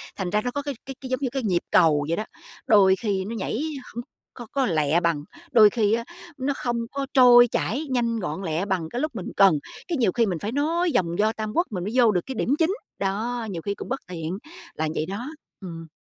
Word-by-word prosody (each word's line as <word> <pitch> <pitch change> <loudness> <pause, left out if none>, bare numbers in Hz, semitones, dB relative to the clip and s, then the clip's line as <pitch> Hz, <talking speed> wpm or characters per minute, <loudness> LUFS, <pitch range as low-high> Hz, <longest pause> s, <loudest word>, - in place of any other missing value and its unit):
thành 190 -3 -3
ra 210 +3 +1
nó 245 - -2
có 285 - -2
cái 285 -1 -4
cái 270 - -7
cái 260 - -7
giống 255 - 0
như 260 - 0
cái 270 -1 -2
nhịp 180 -5 +1
cầu 150 -3 +4
vậy 165 - 0
đó, 215 - -2 0.4
đôi 195 -3 +6
khi 195 -3 -2
nó 225 +4 -5
nhảy 220 +3 -2 0.3
hổng 240 - -4 0.3
có 240 - -9
có 275 -1 +1
lẹ 160 - +2
bằng, 170 -4 0 0.3
đôi 215 -5 +8
khi 210 -1 +1
á, 230 +1 0 0.3
nó 275 +1 -1
không 240 -1 -2
có 275 0 -2
trôi 245 -2 +8
chảy 260 +6 -1
nhanh 235 -3 0
gọn 175 -1 -4
lẹ 165 +2 -1
bằng 185 -5 -2
cái 245 - -3
lúc 305 -4 -2
mình 190 - -5
cần, 190 -7 +6 0.3
cái 340 - -1
nhiều 230 -7 +2
khi 235 +3 +2
mình 180 -6 -2
phải 205 +5 -3
nói 325 +6 +1
vòng 170 -6 +1
vo 215 +1 +3
Tam 215 -1 -4
Quốc 345 +2 +2
mình 185 -4 -3
mới 205 - -3
vô 240 -4 +5
được 180 -3 +1
cái 265 - -5
điểm 265 +5 +1
chính. 330 +3 +3 0.3
Đó, 220 +4 -2
nhiều 170 -4 -5
khi 200 +4 -2
cũng - - -8
bất 265 +2 -2
tiện, 170 0 -4 0.4
là 160 - -1
vậy 155 - -1
đó. 205 - -5 0.3
Ừm. 165 -3 -8
215 Hz, 245 wpm, -24 LUFS, 180-250 Hz, 0.4 s, đôi